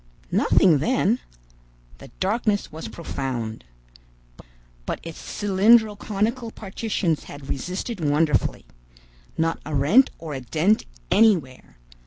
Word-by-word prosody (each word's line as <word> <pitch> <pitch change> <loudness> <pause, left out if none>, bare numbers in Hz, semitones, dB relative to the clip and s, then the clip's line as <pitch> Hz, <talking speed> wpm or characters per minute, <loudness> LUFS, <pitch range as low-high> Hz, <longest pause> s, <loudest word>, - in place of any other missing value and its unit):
Nothing 165 -6 +4
then. 240 - +1 0.8
The - - -11
darkness 205 +1 0
was 155 -6 -7
profound. 115 - -5 1.2
But - - -2
its 165 -1 -8
cylindro 210 +2 +3
conical 225 +4 -2
partitions 195 -6 -2
had 145 -1 -10
resisted 185 - -4
wonderfully. 150 -3 +1 0.7
Not 165 0 0
a 150 0 -4
rent 165 - +5
or 160 -2 -7
a 135 - -5
dent 175 - +1 0.3
anywhere! 180 - +2
180 Hz, 105 wpm, -24 LUFS, 145-215 Hz, 1.2 s, rent